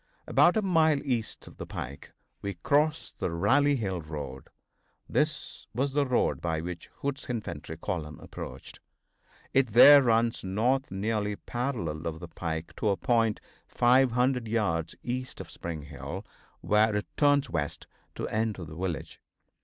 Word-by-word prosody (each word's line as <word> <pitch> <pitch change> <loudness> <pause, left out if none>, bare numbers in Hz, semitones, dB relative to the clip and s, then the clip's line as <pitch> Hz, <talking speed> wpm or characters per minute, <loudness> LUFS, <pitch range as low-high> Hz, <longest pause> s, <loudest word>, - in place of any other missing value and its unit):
About - - +4
a 215 - +1
mile 160 -5 +4
east 120 -5 -2
of - - -14
the - - -7
pike 70 +2 -7 0.3
we 100 -1 -4
crossed 150 - 0
the - - 0
Rally 135 +13 +3
Hill 95 -8 -2
road. 75 -4 -7 0.6
This - - -1
was 135 +3 0
the 145 -1 +2
road 125 - +1
by 80 -2 -1
which 85 0 -6
Hood's 140 0 -3
infantry 80 -10 -5
column 80 -4 -4
approached. 65 +2 -9 0.7
It 130 -5 +3
there 145 +4 +10
runs 115 -2 +2
north 120 +8 +1
nearly 105 +1 -1
parallel 115 - -3
with 80 - -11
the 85 - -6
pike 80 -1 -4
to 110 - +1
a 100 - +1
point 115 -3 +1 0.3
500 125 0 +3
yards 100 -8 0
east 130 +1 -4
of - - -8
Spring 80 -3 -6
Hill, 75 - -7 0.4
where 105 0 +3
it 105 - -1
turns 145 -1 +3
west 75 -4 -3 0.3
to - - -3
enter 110 -5 -1
the 75 - -10
village. 85 -2 -4
110 Hz, 150 wpm, -29 LUFS, 85-130 Hz, 0.7 s, there